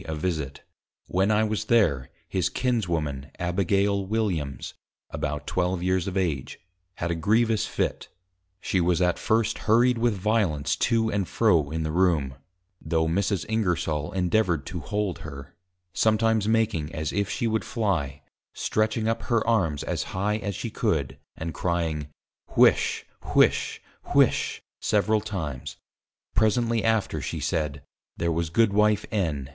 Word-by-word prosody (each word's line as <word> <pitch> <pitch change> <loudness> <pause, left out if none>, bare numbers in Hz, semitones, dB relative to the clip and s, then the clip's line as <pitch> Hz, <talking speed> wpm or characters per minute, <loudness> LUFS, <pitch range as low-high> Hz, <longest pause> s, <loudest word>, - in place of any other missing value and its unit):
_ - - -7
a 80 - -2
Visit. 75 -4 -3 0.4
When 95 +3 +1
I 110 0 +3
was 110 0 -1
there, 80 - +2 0.2
his 90 0 0
Kinswoman, 85 - -1
Abigail 100 +3 +1
Williams, 95 - -2 0.4
(about 75 0 -3
12 90 0 -1
Years 95 0 +1
of 95 0 -2
Age) 80 -8 -2 0.4
had 85 -1 -2
a - - 0
grievous 110 +5 +2
fit; - - -2 0.5
she 95 - 0
was 85 0 +2
at 90 -1 +1
first 110 -1 +1
hurried 120 +2 +4
with 115 -2 +2
violence 95 -7 +1
to 115 -1 +1
and 100 -3 -1
fro 85 -11 +2
in 80 +1 -2
the 80 - -2
Room 80 -6 +2 0.5
(though 80 0 0
Mrs. 95 +3 0
Ingersol 85 -8 -1
endeavoured 90 -4 +1
to 85 - -5
hold 105 +2 -2
her) 70 -3 -9 0.4
sometimes 110 -1 +2
making 110 -9 +1
as 80 -1 -3
if 100 -1 0
she 125 - -2
would 110 -1 0
fly, 80 - -2 0.3
stretching 110 +1 0
up 115 - 0
her 115 -2 +2
Arms 90 -11 +1
as - - -2 0.2
high 105 +3 +1
as 100 -2 -4
she - - -4
could, - - -1 0.2
and 80 0 -4
crying, 80 -3 -1 0.5
Whish, - - +4 0.3
Whish, - - +3 0.4
Whish, - - +3 0.2
several 105 +1 +2
times; 80 - -5 0.6
presently 115 +1 +2
after 110 -2 +1
she - - -4
said, 75 -3 -2 0.3
there 85 0 0
was 85 0 -1
Goodw. 110 +4 +3
_N. 100 -9 +1
95 Hz, 145 wpm, -26 LUFS, 80-110 Hz, 0.6 s, hurried